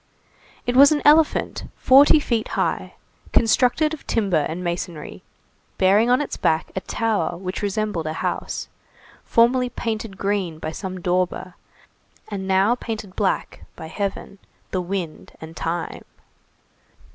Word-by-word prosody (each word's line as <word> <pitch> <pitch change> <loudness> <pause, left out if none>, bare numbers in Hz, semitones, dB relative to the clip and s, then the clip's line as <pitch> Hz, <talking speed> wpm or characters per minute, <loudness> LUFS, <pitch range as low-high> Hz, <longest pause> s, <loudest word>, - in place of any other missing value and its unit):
It 245 - -1
was 280 +3 +8
an 295 -1 +1
elephant 305 +1 +3
forty 280 +4 +6
feet 235 -6 -1
high, - - -1 0.4
constructed 250 +7 +3
of 315 - -9
timber 195 -9 +1
and 175 +3 -5
masonry, 170 -3 -5 0.6
bearing 205 +5 +4
on 250 +3 +4
its 295 - -4
back 160 0 0
a 190 - -2
tower 205 -8 -1
which 185 +1 -5
resembled 205 -5 -2
a 155 - -2
house, - - -3 0.6
formerly 245 +2 +3
painted 220 -4 -4
green 195 -5 -1
by 155 - -5
some 185 +1 -6
dauber, 180 +1 -1 0.8
and 195 -2 -5
now 195 +4 +3
painted 220 -5 -6
black 200 -3 -1
by - - -9
heaven, 200 +1 -4 0.3
the 185 - -1
wind, 175 -3 -5
and 160 +1 -10
time. 165 +1 -4
200 Hz, 135 wpm, -22 LUFS, 180-235 Hz, 0.8 s, was